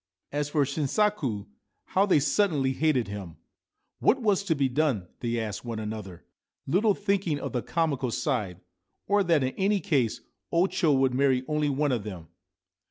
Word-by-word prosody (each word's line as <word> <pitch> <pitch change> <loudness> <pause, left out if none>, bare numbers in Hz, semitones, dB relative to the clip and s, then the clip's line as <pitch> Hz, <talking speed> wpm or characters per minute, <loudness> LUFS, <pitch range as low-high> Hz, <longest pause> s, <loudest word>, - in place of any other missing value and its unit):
As 145 0 -1
for 145 -1 +2
Shinsaku, 140 - 0 0.4
how 195 +2 +2
they 180 - +5
suddenly 145 -4 +1
hated 135 -5 +1
him! 100 -5 -7 0.6
What 270 - +3
was 210 -5 +2
to 165 -5 +1
be 140 -2 +2
done? 130 - 0
they 120 -1 -1
asked 105 -4 -4
one 115 -2 -4
another, 105 -5 -6 0.4
little 200 +7 +2
thinking 195 -7 0
of - - -5
the 125 - 0
comical 145 -6 -1
side, 105 - -2 0.4
or 205 0 +3
that 165 -6 +3
in 130 - -1
any 200 +1 +2
case 135 - 0 0.3
O 170 +2 +4
Cho 160 -7 +2
could 130 -1 +2
marry 130 -1 +2
only 150 -1 0
one 145 +1 +1
of 120 -5 -1
them. 90 -6 -8
140 Hz, 165 wpm, -27 LUFS, 120-170 Hz, 0.6 s, they